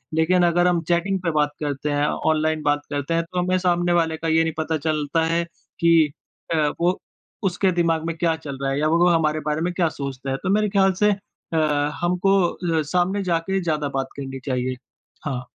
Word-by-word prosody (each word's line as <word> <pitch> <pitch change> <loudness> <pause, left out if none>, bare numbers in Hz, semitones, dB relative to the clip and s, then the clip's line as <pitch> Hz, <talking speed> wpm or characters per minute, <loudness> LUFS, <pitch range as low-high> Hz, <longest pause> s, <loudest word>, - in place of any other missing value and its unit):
लेकिन 175 +3 +3
अगर 175 +1 +3
हम 175 -2 +2
चैटिंग 190 +3 +1
पे 170 - +1
बात 150 -1 +1
करते 145 0 -2
हैं, 145 0 +1
ऑनलाइन 155 0 0
बात 145 0 +1
करते 145 +2 -2
हैं 165 0 +1
तो 180 +2 -4
हमें 185 +1 +1
सामने 175 -1 +1
वाले 165 -2 +1
का 165 - -4
ये 160 0 +3
नहीं 165 -1 -2
पता 160 0 -1
चलता 155 +1 0
है 165 +1 +1 0.4
कि 165 -3 +4 0.4
अ, 150 -2 +2
वो 180 +2 +2 0.4
उसके 190 0 +1
दिमाग 165 -1 +1
में 165 - -2
क्या 165 -1 +1
चल 145 -4 -7
रहा 135 0 0
है 135 - -1
या 155 - +2
वो 170 +2 +4
हमारे 155 -2 +2
बारे 150 +1 0
में 175 +1 -1
क्या 175 -2 +1
सोचता 135 -1 -4
है। 135 - -1
तो 190 - -1
मेरे 210 +1 +2
ख़्याल 195 -1 +3
से 210 - +5
अ, 195 -4 -6 0.4
हमको 180 +3 +2 0.4
अ, - - +2
सामने 180 +6 0
जाके 180 +2 0
ज़्यादा 155 -4 -1
बात 135 - -2
करनी 135 -1 -6
चाहिए। 130 -1 -1 0.5
हाँ। 130 -4 -3
165 Hz, 210 wpm, -23 LUFS, 150-175 Hz, 0.5 s, से